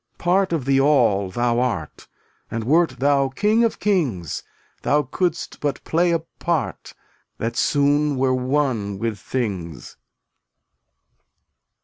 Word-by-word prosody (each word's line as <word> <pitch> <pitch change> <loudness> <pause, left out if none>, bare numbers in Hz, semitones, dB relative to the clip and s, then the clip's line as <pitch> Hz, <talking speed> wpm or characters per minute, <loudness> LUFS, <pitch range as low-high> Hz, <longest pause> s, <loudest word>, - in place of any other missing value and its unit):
Part 185 +2 +1
of 160 -7 -1
the 135 0 +3
All 120 -9 +3
thou 120 +4 0
art, 100 - -3 0.4
And 115 0 -3
wert 160 +3 +2
thou 140 +1 +2
king 210 - +2
of 230 - +1
kings, 130 - -1 0.4
Thou 150 +1 +2
couldst 170 +5 -2
but 145 -2 -2
play 175 +2 +1
a 170 - +3 0.2
part 170 -4 -2 0.4
That 115 +1 -3
soon 145 0 +2
were 130 0 +2
one 130 -6 0
with 110 -1 -3
things. 95 - -4
135 Hz, 120 wpm, -22 LUFS, 115-155 Hz, 0.4 s, the